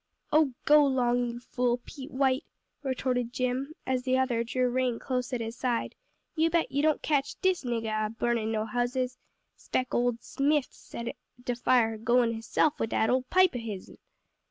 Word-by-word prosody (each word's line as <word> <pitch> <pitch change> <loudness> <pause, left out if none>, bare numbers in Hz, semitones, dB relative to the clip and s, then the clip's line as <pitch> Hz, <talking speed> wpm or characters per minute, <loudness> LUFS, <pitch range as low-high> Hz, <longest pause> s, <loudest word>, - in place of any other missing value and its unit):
"Oh 300 -5 +4
go 300 0 +7
'long, 245 -3 +2
you 235 0 -6
fool, 245 0 0
Pete 275 -3 -9
White!" 265 +2 +1 0.4
retorted 255 -3 -1
Jim, 255 +4 -2
as 255 -1 0
the 260 0 +1
other 250 -3 +1
drew 250 +2 0
rein 250 -1 0
close 250 -1 -2
at 245 -2 -2
his 225 +1 -4
side, 245 -2 -1 0.4
"you 325 0 +3
bet 335 0 +1
you 280 - +1
don't 310 0 +2
catch 285 -3 0
dis 375 -3 +1
niggah 225 -3 -1
a - - -8
burnin' 225 -1 -1
no 215 -1 0
houses. 250 +2 -1 0.4
Spect 255 - -2
ole 245 -1 +2
Smith 285 +2 0
set 235 0 -7 0.3
de 245 -1 -1
fire 230 -3 +2
goin' 235 +1 +3
hisself 230 +7 0
wid 225 - -1
dat 220 +1 +2
ole 255 0 +1
pipe 370 -4 +4
o' - - -1
his'n!" 210 -5 -7
250 Hz, 180 wpm, -29 LUFS, 235-265 Hz, 0.4 s, go